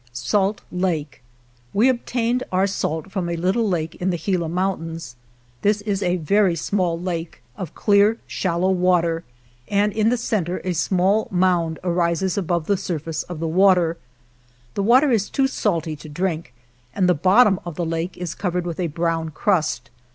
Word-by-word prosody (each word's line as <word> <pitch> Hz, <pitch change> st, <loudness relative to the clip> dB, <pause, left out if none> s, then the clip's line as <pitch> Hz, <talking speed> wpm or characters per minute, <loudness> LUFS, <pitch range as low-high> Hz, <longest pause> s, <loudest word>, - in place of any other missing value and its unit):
| -, -, -35 dB
" -, -, -28 dB, 0.2 s
Salt 200 Hz, +1 st, +2 dB
Lake 165 Hz, -7 st, -2 dB, 0.3 s
" 120 Hz, 0 st, -35 dB
We 220 Hz, +6 st, +5 dB
obtained 245 Hz, -1 st, 0 dB
our 185 Hz, +1 st, +3 dB
salt 190 Hz, -2 st, -3 dB
from 185 Hz, -4 st, -2 dB
a 170 Hz, -, -1 dB
little 190 Hz, +6 st, +1 dB
lake 165 Hz, -3 st, -1 dB
in 185 Hz, -, +1 dB
the 175 Hz, -, 0 dB
Gila 170 Hz, 0 st, -1 dB
Mountains. 165 Hz, -6 st, -3 dB, 0.5 s
This 205 Hz, 0 st, +2 dB
is 205 Hz, -2 st, -2 dB
a 180 Hz, -2 st, +1 dB
very 185 Hz, +2 st, +2 dB
small 170 Hz, 0 st, -1 dB
lake 170 Hz, -6 st, -5 dB
of 170 Hz, +1 st, -7 dB
clear, 205 Hz, +2 st, +4 dB
shallow 185 Hz, +1 st, 0 dB
water, 175 Hz, -3 st, +2 dB, 0.4 s
and 205 Hz, +1 st, +1 dB
in 220 Hz, 0 st, +2 dB
the 245 Hz, -, +1 dB
cen 215 Hz, -6 st, -1 dB
ter 180 Hz, +2 st, -3 dB
a 185 Hz, -, -1 dB
small 190 Hz, +5 st, +1 dB
mound 175 Hz, -3 st, +1 dB
arises 175 Hz, +1 st, 0 dB
above 175 Hz, -4 st, -1 dB
the 200 Hz, +2 st, +1 dB
surface 165 Hz, -4 st, -3 dB
of 175 Hz, -3 st, -7 dB
the 165 Hz, -, -2 dB
water. 180 Hz, -1 st, +4 dB, 0.8 s
The -, -, -1 dB
water 255 Hz, +7 st, +5 dB
is 215 Hz, -4 st, +1 dB
too 270 Hz, -, +1 dB
salty 170 Hz, -, -1 dB
to 155 Hz, -, -11 dB
drink, 165 Hz, -2 st, -2 dB, 0.4 s
and 185 Hz, -2 st, +2 dB
the 180 Hz, -, +5 dB
bottom 190 Hz, +5 st, +4 dB
of 175 Hz, -3 st, -7 dB
the 175 Hz, -, -2 dB
lake 165 Hz, +2 st, -3 dB
is 175 Hz, -2 st, -4 dB
covered 180 Hz, -2 st, -2 dB
with 170 Hz, -1 st, -4 dB
a 175 Hz, -, 0 dB
brown 165 Hz, 0 st, -1 dB
crust. 155 Hz, -7 st, 0 dB
180 Hz, 180 wpm, -22 LUFS, 165-200 Hz, 0.8 s, We